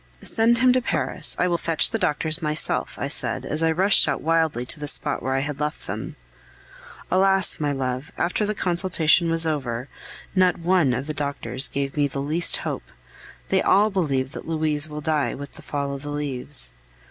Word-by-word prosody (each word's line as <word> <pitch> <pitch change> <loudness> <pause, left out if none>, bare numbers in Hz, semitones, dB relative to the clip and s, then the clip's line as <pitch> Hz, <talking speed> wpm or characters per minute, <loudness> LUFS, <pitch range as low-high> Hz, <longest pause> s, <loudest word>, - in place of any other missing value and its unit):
"Send 230 +1 +2
him 255 +1 +4
to 255 - +2
Paris; 180 -7 +1
I 180 - +1
will 170 -1 0
fetch 165 -2 0
the - - -2
doctors 155 +3 0
myself," 150 -1 +1
I - - -3
said, - - 0
as 155 +2 -1
I 165 - +2
rushed 190 +5 +4
out - - -1
wildly 160 -6 +1
to 150 - +1
the 150 - -5
spot - - +3
where 130 0 -2
I 135 - +1
had 145 0 -5
left 150 0 -4
them. - - -6 1.0
Alas! 190 0 +3
my 145 -2 0
love, 130 0 -3
after 180 +5 0
the 210 +1 -2
consultation 175 -2 +2
was 165 0 +1
over, 130 -5 -3 0.4
not 185 -1 +3
one 170 -6 +2
of 130 +3 -4
the 155 - -4
doctors 140 -2 -1
gave 140 0 -4
me 145 -1 +2
the 140 0 -6
least 155 +5 +1
hope; - - -6 0.6
they 190 - +2
all 210 +3 +3
believe 140 -8 -1
that - - -9
Louise 155 -2 0
will 150 0 -6
die 150 -2 -1
with 140 0 -9
the - - -10
fall 140 -1 -4
of 140 - -7
the 145 - -7
leaves. 145 -1 0
155 Hz, 195 wpm, -23 LUFS, 140-175 Hz, 1.0 s, him